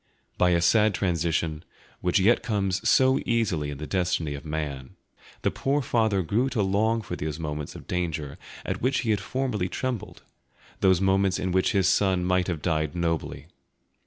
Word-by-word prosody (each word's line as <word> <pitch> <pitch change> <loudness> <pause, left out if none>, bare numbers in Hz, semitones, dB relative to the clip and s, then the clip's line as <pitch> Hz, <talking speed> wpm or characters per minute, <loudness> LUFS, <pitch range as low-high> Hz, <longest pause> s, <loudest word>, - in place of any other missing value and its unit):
By 90 - +3
a 85 -1 +3
sad 105 +3 +4
transition, 85 -3 -1 0.4
which 90 +2 +2
yet 110 +6 +4
comes 100 0 -1
so 130 +2 +4
easily 100 -11 0
in 70 - -6
the 75 - -6
destiny 85 -4 -1
of 70 - -7
man, 75 -4 -5 0.5
the - - +2
poor 140 +1 0
father 110 -6 +1
grew 115 +10 +1
to 110 -6 0
long 110 +4 +1
for 90 - -5
those 75 -3 -4
moments 75 -2 -5
of - - -10
danger 80 -5 -3 0.3
at - - -3
which 130 +3 +1
he 115 -3 0
had 105 -2 +1
formerly 110 -5 -2
trembled, 125 -2 -4 0.6
those 95 -2 +4
moments 95 0 +2
in 95 - -2
which 95 +3 +2
his 95 -2 +3
son 95 -2 +2
might 90 0 +1
have 85 -5 -3
died 80 -2 0
nobly. 85 -2 -2
90 Hz, 175 wpm, -26 LUFS, 80-105 Hz, 0.6 s, sad